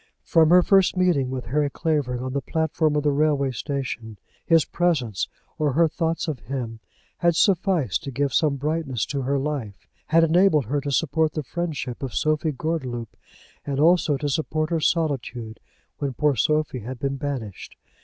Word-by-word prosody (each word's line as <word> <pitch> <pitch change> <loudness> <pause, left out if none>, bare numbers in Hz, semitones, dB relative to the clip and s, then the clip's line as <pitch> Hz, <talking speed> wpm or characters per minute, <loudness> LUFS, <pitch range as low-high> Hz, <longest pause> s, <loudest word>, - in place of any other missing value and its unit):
From 160 -3 +4
her 180 +1 +7
first 195 -1 +3
meeting 170 -8 +2
with 130 -1 -4
Harry 145 +6 0
Clavering 140 -6 -1
on 130 0 -4
the 140 - -1
platform 160 +1 0
of 150 - +1
the 145 - +3
railway 140 -2 +1
station 125 -5 -4 0.3
his 165 -2 +4
presence, 135 - 0 0.3
or 150 -3 +1
her 165 +4 +4
thoughts 165 +1 -2
of 150 -6 -3
him, 115 -2 -5 0.4
had 170 -1 +3
sufficed 170 - +2
to - - -5
give 140 0 -1
some 150 -3 +2
brightness 145 -4 -2
to 140 -1 -3
her 140 +2 0
life, 135 -8 -4 0.2
had 165 +1 +4
enabled 165 -3 +4
her 145 +6 -1
to 140 - -3
support 155 +2 +1
the 155 - -3
friendship 150 -4 -4
of 135 -3 -5
Sophie 155 +1 +1
Gordeloup, 130 -6 -4 0.5
and 140 -1 -3
also 160 -2 +4
to 145 +2 -3
support 155 +2 -1
her 165 - +1
solitude 130 -9 -1 0.4
when 140 -2 -2
poor 150 -2 +2
Sophie 150 +2 +1
had 125 +4 -7
been 135 +2 -2
banished. 130 -9 -5
145 Hz, 175 wpm, -24 LUFS, 130-160 Hz, 0.5 s, her